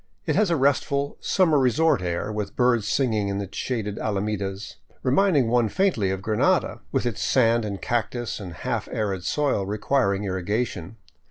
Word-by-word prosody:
It - - 0
has 215 -3 +3
a 170 - +2
restful, 140 0 +1
summer 165 -6 +3
resort 135 - +3
air, 85 +3 -2
with 105 -1 -4
birds 120 -4 +2
singing 110 -7 +1
in 100 0 -2
its 100 -1 -6
shaded 110 -5 -3
alamedas, 100 -1 -3 0.3
reminding 140 -1 +3
one 120 -1 +2
faintly 180 - +1
of 95 0 -3
Granada, 110 -1 +1
with - - 0
its 120 -4 -2
sand 115 -3 +3
and 100 -2 -4
cactus 120 0 -2
and 95 -4 -7
half 80 - -3
arid 100 -4 -2
soil 140 -1 0
requir 105 +1 +1
ing 100 - -4
irrigation. 95 0 -2
110 Hz, 165 wpm, -24 LUFS, 100-135 Hz, 0.3 s, has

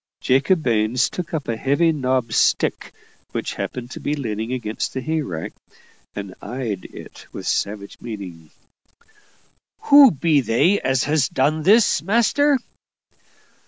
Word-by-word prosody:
Jacob 140 +6 +2
Baines 115 0 +1
took 180 -3 -6
up 155 -4 -3
a 115 - -1
heavy 145 +8 +2
knobbed 130 -6 -1
stick - - +1 0.4
which - - -3
happened 125 0 -6
to - - -7
be 150 - -2
leaning 110 -4 -4
against 115 -3 -4
the - - -1
hay 155 +3 -1
rick, 85 - -6 0.6
and 100 -2 -6
eyed 110 -5 -5
it - - -12
with - - -8
savage 100 0 -3
meaning. 95 -9 -8 1.3
"Who 285 -2 +8
be 155 -4 +1
they 135 - +2
as 130 -1 +1
has 145 -2 +1
done 155 +4 0
this, 205 -2 +4
master?" 235 - +2
130 Hz, 135 wpm, -21 LUFS, 110-160 Hz, 1.3 s, Who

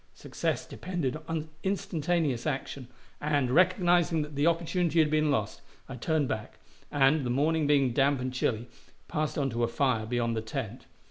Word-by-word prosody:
Success - - -3
depended 170 -8 -3
on 160 -1 -3
instantaneous 170 - -1
action, 135 -1 -4 0.3
and, 145 -4 +1
recognizing 175 -1 +3
that 150 0 -9
the 145 +3 +1
opportunity 170 0 +1
had 155 -2 +4
been 155 0 +2
lost, 110 -5 -1 0.3
I 135 - -7
turned 150 +3 0
back, 110 -3 -5 0.3
and, 145 +1 +3
the 125 - -2
morning 150 +4 +1
being 140 -4 +3
damp 140 +1 +3
and 125 0 -3
chilly, 120 -2 -1 0.4
passed 155 -1 -2
on 135 -3 0
to 120 +1 -1
a - - +3
fire 115 -3 0
beyond 120 -1 0
the 110 - -1
tent. 115 0 -6
145 Hz, 170 wpm, -29 LUFS, 125-160 Hz, 0.4 s, had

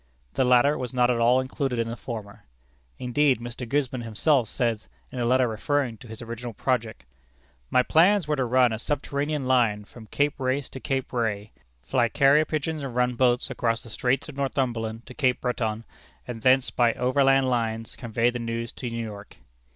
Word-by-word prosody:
The - - +2
latter 125 +4 +4
was 125 -1 -5
not 125 0 +4
at 120 - 0
all 120 +2 +4
included 130 -1 -2
in 115 0 0
the 115 - -4
former. 110 -3 -8 0.5
Indeed, 130 +1 +2
Mr. 120 0 -7
Gisborne 130 -3 -1
himself 115 +2 +1
says, 115 -4 -2 0.2
in 130 - -6
a 120 - 0
letter 130 +1 +3
referring 120 +2 -1
to 125 - -13
his 110 +1 -8
original 120 0 -6
project: 110 - -2 0.6
"My 125 - +4
plans 180 +5 +4
were 150 - +1
to 130 -3 0
run 125 -1 +3
a 110 - -4
subterranean 145 +2 -2
line 115 -5 +2
from 110 +1 -14
Cape 145 +4 0
Race 130 +1 -1
to 130 - -8
Cape 135 0 -3
Ray, 110 -3 -2 0.3
fly 120 -3 +1
carrier 140 +4 +4
pigeons 155 0 -3
and 135 -4 -6
run 125 0 +2
boats 125 0 +1
across 115 0 -1
the 115 - -11
Straits 125 +4 0
of 150 - -9
Northumberland 120 -5 -2
to - - -11
Cape 130 -2 +1
Breton, 115 -3 -2 0.4
and 120 -2 -6
thence 130 +2 +3
by 120 -2 +2
overland 135 +1 +3
lines 115 -2 -2
convey 120 0 0
the 120 - -5
news 115 0 -4
to 125 - -6
New 115 0 -4
York." 105 -1 -10
125 Hz, 190 wpm, -25 LUFS, 115-135 Hz, 0.6 s, latter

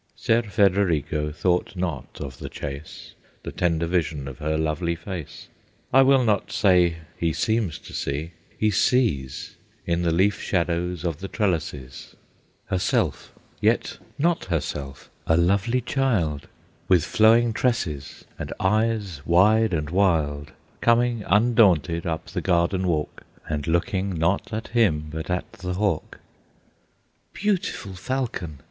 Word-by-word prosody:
Ser 115 +1 +2
Federigo 90 - +1
thought 90 +5 0
not 85 -7 -4
of 65 -3 -7
the - - -6
chase; 70 +1 -8 0.3
The - - -5
tender 85 -2 0
vision 80 -5 -1
of 65 -2 -8
her 80 +1 -1
lovely 80 +2 -1
face, 80 -4 -8 0.5
I 135 - +7
will 135 -1 +5
not 105 -4 +1
say 90 -4 +4 0.2
he 85 -1 0
seems 105 -1 0
to - - -13
see, 75 +4 -3 0.3
he 110 0 +2
sees 95 - 0 0.3
In 85 0 0
the 85 - +1
leaf 95 +5 +2
shadows 90 -1 -1
of 85 -3 -2
the 95 - -5
trellises, 80 - -3 0.5
Herself, 95 -1 -1 0.3
yet - - +1 0.2
not 170 +3 +1
herself; 70 -5 -4 0.2
a 80 - +4
lovely 100 +8 +2
child 110 - 0 0.4
With 90 -4 +4
flowing 115 +4 +4
tresses, 85 - -2
and - - -5
eyes 105 -5 0
wide 105 +6 +4
and 75 -3 -2
wild, 80 -6 +1 0.3
Coming 115 -1 +2
undaunted 95 -6 +3
up 80 -1 -2
the 95 -3 -4
garden 90 +1 +1
walk, 75 -3 -2 0.2
And 75 -2 -3
looking 95 +3 0
not 85 +4 0
at 110 0 -4
him, 85 -11 +2
but 80 +2 -5
at 90 0 -2
the 90 -1 -5
hawk. 100 -5 -1 1.2
"Beautiful 200 - -2
falcon!" 95 - -3
90 Hz, 130 wpm, -24 LUFS, 80-105 Hz, 1.2 s, I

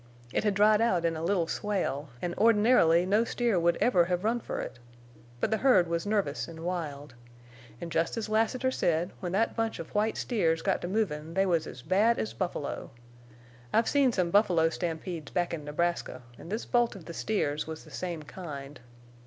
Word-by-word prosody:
It - - +1
had 210 -2 +1
dried 210 +1 +5
out 185 -7 +2
in 165 -1 +1
a 160 - -5
little 170 0 +1
swale, 165 -7 -2
an' 175 -1 -1
ordinarily 210 -6 +5
no 205 +4 +3
steer 235 -4 0
would 170 0 +2
ever 180 -9 +4
hev 180 +1 -1
run 230 +3 +1
fer - - -5
it. 120 - -6 0.6
But - - 0
the 220 - +2
herd 210 -9 +4
was 170 +3 -2
nervous 200 -10 -1
en' 165 0 -9
wild. 150 -6 -4 0.7
An' 170 - -6
jest 165 +6 0
as 225 - -2
Lassiter 225 +4 +1
said, 170 -6 0
when 180 -2 -4
that 220 +4 +1
bunch 225 -1 -1
of 165 - -8
white 215 +1 +1
steers 165 -9 0
got - - +1
to - - -3
movin' 165 -6 -2
they 195 0 +3
was 170 -4 +1
as 125 - -9
bad 205 +8 +3
as 110 0 -3
buffalo. 115 - -4 0.8
I've 225 0 +3
seen 280 -3 +3
some 180 -6 0
buffalo 175 -5 +4
stampedes 165 -2 -4
back 175 -1 -1
in 155 -3 -4
Nebraska, 150 -4 -2 0.2
an' - - -10
this 215 +4 -3
bolt 240 -3 +1
of 180 -5 -11
the 170 - -7
steers 155 -8 -1
was 160 0 -7
the 155 - -15
same 170 +1 -4
kind. 145 -4 -8
175 Hz, 195 wpm, -29 LUFS, 165-215 Hz, 0.8 s, dried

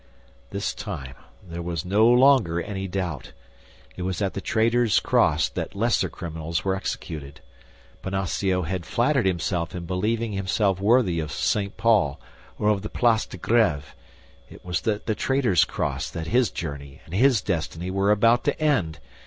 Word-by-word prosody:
This - - -3
time 65 -2 -6 0.3
there 85 0 -6
was 85 -1 -4
no 105 +5 +4
longer 125 -8 +5
any 95 +2 -4
doubt; 90 -6 -4 0.6
it - - -7
was 90 -1 -2
at 100 -2 -1
the 100 - -4
Traitor's 115 0 +2
Cross - - +2
that - - -5
lesser 115 +3 +1
criminals 85 -1 -5
were 95 -1 +1
executed. 75 -7 -6 0.6
Bonacieux 95 -1 -1
had 90 +2 -3
flattered 120 - +1
himself 90 0 -1
in 85 -1 -5
believing 110 +6 -1
himself 95 0 0
worthy 100 -4 +3
of 75 -1 -4
St. 100 +5 -1
Paul 105 -11 +2 0.4
or 105 - +1
of 105 -2 +1
the 105 - -6
Place 115 -2 +2
de - - -9
Grêve; 85 -9 +1 0.6
it - - -14
was 90 0 -3
at 105 -1 -1
the 110 - 0
Traitor's 130 -5 +2
Cross - - -3
that 80 - -5
his 120 +5 +2
journey 70 -3 -7
and 80 - -13
his 125 +3 +4
destiny 85 -1 -3
were 95 +1 +1
about 115 +3 +4
to - - 0
end! 105 - +1
95 Hz, 160 wpm, -24 LUFS, 85-110 Hz, 0.6 s, longer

